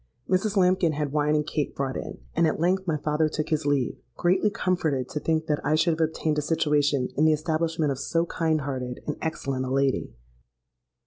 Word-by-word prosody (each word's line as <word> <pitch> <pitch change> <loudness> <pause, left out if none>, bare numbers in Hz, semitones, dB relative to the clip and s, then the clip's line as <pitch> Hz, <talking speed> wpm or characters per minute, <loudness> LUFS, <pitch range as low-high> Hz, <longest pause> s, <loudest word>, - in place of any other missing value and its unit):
Mrs. 195 +3 +1
Lambkin 180 -3 +3
had 145 -1 -2
wine 150 0 +2
and 150 0 +1
cake 150 -1 -2
brought 135 -1 -2
in; - - -5 0.2
and 165 0 +4
at 155 - -1
length 185 +3 +1
my 160 -2 +1
father 150 +1 +1
took 155 0 -3
his 155 -2 0
leave, 140 -4 0 0.2
greatly 185 +4 +3
comforted 160 -10 0
to 150 - -3
think 160 +1 0
that 150 -2 -1
I 150 - +2
should 160 +2 +3
have 160 -1 +3
obtained 155 -1 -1
a - - 0
situation 145 -4 +1
in 155 - +3
the 155 - +5
establishment 160 0 0
of 135 - -3
so 165 +4 0
kind 160 -2 0
hearted 130 -3 -4
and 150 - -2
excellent 135 -5 -2
a - - -4
lady. 135 0 0
155 Hz, 205 wpm, -26 LUFS, 145-165 Hz, 0.2 s, the